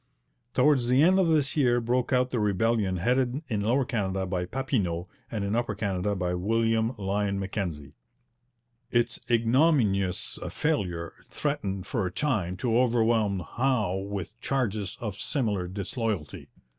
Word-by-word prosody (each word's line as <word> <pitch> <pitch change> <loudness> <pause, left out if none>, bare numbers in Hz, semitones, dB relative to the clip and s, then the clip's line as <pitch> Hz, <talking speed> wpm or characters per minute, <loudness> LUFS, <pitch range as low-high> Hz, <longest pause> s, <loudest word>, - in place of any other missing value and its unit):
Towards 140 -5 +4
the 130 +4 +4
end 185 +3 +5
of 185 - +3
this 150 -4 +2
year 125 -5 +3
broke 120 +2 0
out 125 0 +2
the 120 - 0
rebellion 105 -1 +1
headed 125 - +1
in 105 -4 0
Lower 125 +6 +2
Canada 95 -5 -1
by 90 -1 -2
Papineau 95 -7 -1 0.2
and 105 -3 -3
in 100 +2 -1
Upper 120 -3 -1
Canada 100 -1 -1
by 90 -2 -1
William 115 +5 +1
Lyon 100 0 -1
Mackenzie. 85 -8 -4 1.0
Its 120 -1 +1
ignominious 115 - +2
failure 90 - -1 0.2
threatened 100 -11 -2
for 110 -5 -1
a - - -5
time 95 -8 -1
to 115 +2 +1
overwhelm 115 -5 +2
Howe 120 -7 0
with 100 +3 -5
charges 110 -8 -1
of 105 -4 -4
similar 115 -7 -1
disloyalty. 100 - -4
110 Hz, 140 wpm, -27 LUFS, 95-125 Hz, 1.0 s, end